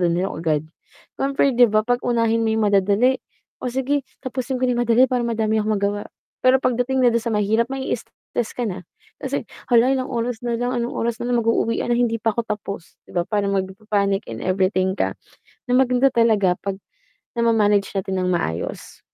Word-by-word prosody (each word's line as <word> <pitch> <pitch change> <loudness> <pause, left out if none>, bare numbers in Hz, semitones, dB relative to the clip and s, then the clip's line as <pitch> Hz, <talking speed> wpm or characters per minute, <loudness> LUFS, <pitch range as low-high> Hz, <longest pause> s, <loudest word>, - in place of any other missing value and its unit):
na 175 - +3
din 180 - 0
agad," 155 -2 -1 0.6
Parang 275 0 -1
fair 275 - +4
'di 245 -1 +6
ba? 215 0 +2
'Pag 245 +1 +1
unahin 230 -2 +1
mo 225 - +1
yung 220 - +2
madadali, 205 +7 +3 0.4
"O - - -2
sige, 265 +3 0 0.2
tapusin 260 0 -3
ko 255 - -1
na 245 -1 +1
madali 240 +1 +5
para 255 -1 0
madami 220 -2 0
akong 215 0 0
magawa," 205 +1 -1 0.4
Pero 255 +1 +5
pagdating 255 +1 +1
na 245 - +6
dun 235 0 +2
sa 235 - -1
mahirap 215 +2 +2
mai 270 0 -4
stess 235 0 -6
ka 245 -2 -2
na, 185 -2 -6 0.3
kasi - - -3 0.2
"Hala 235 +1 +6
ilang 260 +1 -3
oras 240 0 -2
nalang, 245 +1 -1
anong 240 0 -2
oras 235 0 -1
nalang 240 0 0
mag-uuwian 230 0 0
na 240 - +2
hindi 230 -2 +1
pa 225 -1 0
ako 235 - 0
tapos," 200 -6 -6
'Di - - -12
ba? 175 - +2
Parang 200 0 0
magpa-panic 195 +1 -1
in 115 0 -6
everything 185 0 +1
ka, - - -2 0.5
na 250 - +3
maganda 255 0 +4
talaga 215 -7 +3
'pag 195 -1 -3 0.5
nama-manage 215 -4 +2
natin 190 -1 -1
ng 180 - 0
maayos. 85 - -3
230 Hz, 190 wpm, -22 LUFS, 200-245 Hz, 0.6 s, di